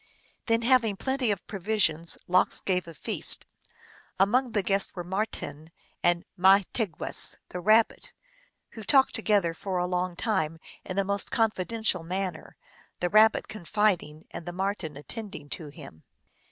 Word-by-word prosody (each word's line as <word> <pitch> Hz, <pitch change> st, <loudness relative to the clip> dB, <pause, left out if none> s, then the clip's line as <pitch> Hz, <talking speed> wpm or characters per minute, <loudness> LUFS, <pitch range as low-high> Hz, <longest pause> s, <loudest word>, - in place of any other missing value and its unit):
Then 230 Hz, 0 st, +2 dB
having 235 Hz, -4 st, +3 dB
plenty 265 Hz, -1 st, -1 dB
of 200 Hz, -3 st, -2 dB
provisions, 190 Hz, -5 st, +1 dB
Lox 180 Hz, +1 st, +2 dB
gave 180 Hz, -2 st, -1 dB
a 165 Hz, -, -9 dB
feast. -, -, +1 dB, 0.7 s
Among 240 Hz, +6 st, +2 dB
the 205 Hz, -, +1 dB
guests 195 Hz, +1 st, +1 dB
were 175 Hz, -, -4 dB
Marten 175 Hz, -5 st, -4 dB, 0.3 s
and 175 Hz, 0 st, +2 dB
Mahti 195 Hz, +4 st, +3 dB
gwess, 165 Hz, -, +1 dB
the 180 Hz, -, -5 dB
Rabbit, 215 Hz, +5 st, +3 dB, 0.6 s
who 220 Hz, -, -9 dB
talked 270 Hz, +3 st, +4 dB
together 205 Hz, -7 st, +2 dB
for 185 Hz, +2 st, -4 dB
a 180 Hz, -, +1 dB
long 180 Hz, 0 st, -2 dB
time 175 Hz, -6 st, -1 dB, 0.3 s
in 185 Hz, -, -6 dB
the 195 Hz, -, +2 dB
most 200 Hz, 0 st, +1 dB
confidential 220 Hz, -3 st, 0 dB
manner, 180 Hz, 0 st, -4 dB, 0.4 s
the 175 Hz, -, 0 dB
Rabbit 215 Hz, +1 st, +5 dB
con 215 Hz, -4 st, -9 dB
fiding 170 Hz, -6 st, 0 dB
and 175 Hz, -, -8 dB
the 175 Hz, -, -4 dB
Marten 185 Hz, -5 st, -3 dB
attending 190 Hz, -2 st, -8 dB
to 155 Hz, -, -5 dB
him. 140 Hz, -, -13 dB
190 Hz, 150 wpm, -27 LUFS, 175-215 Hz, 0.7 s, Rabbit